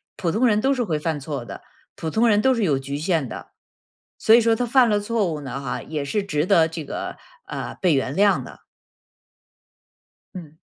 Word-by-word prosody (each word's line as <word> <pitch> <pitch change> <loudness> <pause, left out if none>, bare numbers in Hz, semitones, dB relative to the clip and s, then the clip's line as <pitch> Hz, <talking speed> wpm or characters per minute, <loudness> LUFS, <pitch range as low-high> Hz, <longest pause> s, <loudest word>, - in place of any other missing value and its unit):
普 170 -3 -1
通 245 +5 +2
人 210 -1 +2
都 275 +1 +2
是 250 - -1
会 160 -5 -1
犯 155 0 -2
错 140 -3 -5
的， - - -9 0.4
普 160 - -3
通 225 +7 +2
人 210 0 +3
都 265 +2 +4
是 230 - 0
有 145 -8 +1
局 140 +1 -5
限 160 -3 0
的。 - - -8 0.7
所 220 - +4
以 - - +7
说 230 -1 +3
他 245 - -1
犯 245 0 +4
了 210 -1 +2
错 205 -4 -1
误 150 - -5
呢 135 -1 -5
哈， 125 -2 -4
也 150 -2 -4
是 205 +8 -1
值 150 -6 -1
得 170 -4 +4
这 160 -2 -6
个 - - -5 0.3
呃， - - -5
被 180 -4 +3
原 135 0 -1
谅 200 +1 +3
的。 - - -13 1.7
嗯。 160 -4 -10
175 Hz, 225 characters per minute, -23 LUFS, 150-220 Hz, 1.7 s, 以